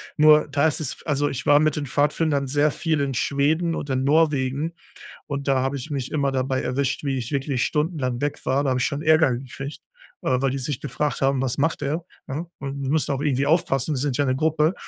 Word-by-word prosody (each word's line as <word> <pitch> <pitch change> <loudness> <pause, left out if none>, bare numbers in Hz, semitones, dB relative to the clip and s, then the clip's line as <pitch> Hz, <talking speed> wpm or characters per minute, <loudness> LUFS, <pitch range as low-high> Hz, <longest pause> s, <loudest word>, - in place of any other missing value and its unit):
Nur, 155 0 +6
da 140 +1 +1
ist 155 - +1
es 150 -5 -5
also 145 -2 +1
ich 135 -2 -4
war 145 0 +6
mit 155 0 +2
den 150 - -3
Pfadfindern 145 0 +1
sehr 145 +3 +2
viel 155 0 -1
in 140 -1 -1
Schweden 155 +6 +1
und 145 - -5
in 130 0 0
Norwegen 150 -1 +2 0.6
und 140 -1 -4
da 135 -1 +3
habe 135 +1 -1
ich 135 +5 -8
mich 135 -3 -3
immer 140 -3 +1
dabei 130 0 0
erwischt, 130 +2 -1
wie 140 -2 -1
ich 125 +1 -4
wirklich 135 -3 0
stundenlang 150 -6 -1
weg 145 0 -3
war. 135 +2 +1
Da 135 - +1
habe 130 - +1
ich - - +2
schon 140 -1 -3
Ärger 160 -4 +4
gekriegt, 135 +2 -8 0.4
äh, 130 - +2
weil 135 0 +1
die 135 - -2
sich 130 0 -3
gefragt 145 0 -2
haben: 135 -1 +2
„Was 130 -1 -1
macht 160 +2 0
er,“ 155 +4 -2 0.2
ne? 150 +6 -4
Und 140 0 -5
die 135 - -2
müssen 155 -1 +1
auch 135 - -2
irgendwie 140 -2 +1
aufpassen, 155 -3 +1
wir - - -2
sind 135 0 -1
ja 145 - +2
'ne 130 0 +1
Gruppe 155 +3 +2
140 Hz, 235 wpm, -23 LUFS, 135-150 Hz, 0.6 s, Nur